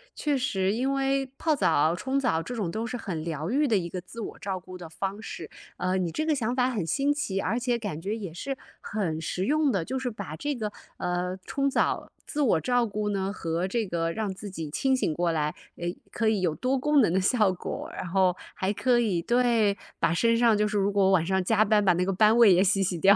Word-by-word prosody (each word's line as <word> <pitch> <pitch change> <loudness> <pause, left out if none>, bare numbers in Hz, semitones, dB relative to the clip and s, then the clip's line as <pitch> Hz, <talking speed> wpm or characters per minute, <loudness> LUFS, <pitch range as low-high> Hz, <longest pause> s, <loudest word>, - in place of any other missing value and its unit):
确 290 -2 0
实 195 -7 0
因 265 +4 0
为 275 0 +1
泡 315 -2 +1
澡 160 - +3
冲 265 +8 -1
澡 240 -12 +1
这 245 +8 -6
种 190 -7 -2
都 220 +2 -3
是 250 - -4
很 180 -9 -4
疗 160 +1 -3
愈 290 +4 +2
的 225 - +2
一 170 -2 -3
个 180 - -4
自 230 +6 -9
我 - - -7
照 190 -2 -3
顾 185 +1 -10
的 175 -2 -9
方 195 +5 -4
式， - - -7 0.3
呃， 185 +1 0
你 175 -3 -1
这 310 - -2
个 315 - +2
想 240 -1 -1
法 255 0 +2
很 210 -10 -2
新 280 - +1
奇， 195 -10 -2
而 230 +5 0
且 240 -1 0
感 205 -9 -4
觉 205 +4 -2
也 195 -7 -6
是 270 +9 -4 0.2
很 180 -7 -2
实 180 +4 -2
用 300 -1 +2
的， 190 -6 0
就 265 - -3
是 255 -1 -2
把 200 -8 -7
这 290 - -2
个， 215 -3 -3 0.3
呃， 180 +1 -2
冲 275 0 0
澡， - - 0 0.2
自 300 - -2
我 215 - +3
照 245 -1 +2
顾 210 0 -2
呢 195 0 -1
和 170 +1 -2
这 225 +2 -1
个 165 -2 -1
让 210 -3 -2
自 205 +2 -8
己 165 -5 -6
清 265 - +1
醒 165 -11 0
过 170 +1 0
来， 150 -1 0 0.2
唉， 175 +1 -3 0.2
可 225 -1 +1
以 215 -3 +1
有 165 -4 +1
多 260 +1 0
功 295 +1 +3
能 190 - +3
的 190 - +2
效 205 0 +3
果， 180 - -5
然 - - -5
后 185 0 +2 0.2
还 190 +1 0
可 240 +3 +2
以 195 -8 +1
对， 235 -3 +2 0.2
把 - - +2
身 230 +6 +3
上 230 -3 +4
就 210 0 +2
是 210 0 -1
如 200 0 +2
果 195 -1 +3
晚 170 -4 +3
上 190 +1 +1
加 215 +2 +3
班， 210 0 +3
把 190 - +5
那 180 +1 0
个 195 - 0
班 215 +4 +5
味 225 -5 +8
也 180 +2 +4
洗 195 0 +2
洗 185 -2 0
掉。 195 +5 +6
205 Hz, 265 characters per minute, -27 LUFS, 180-245 Hz, 0.3 s, 味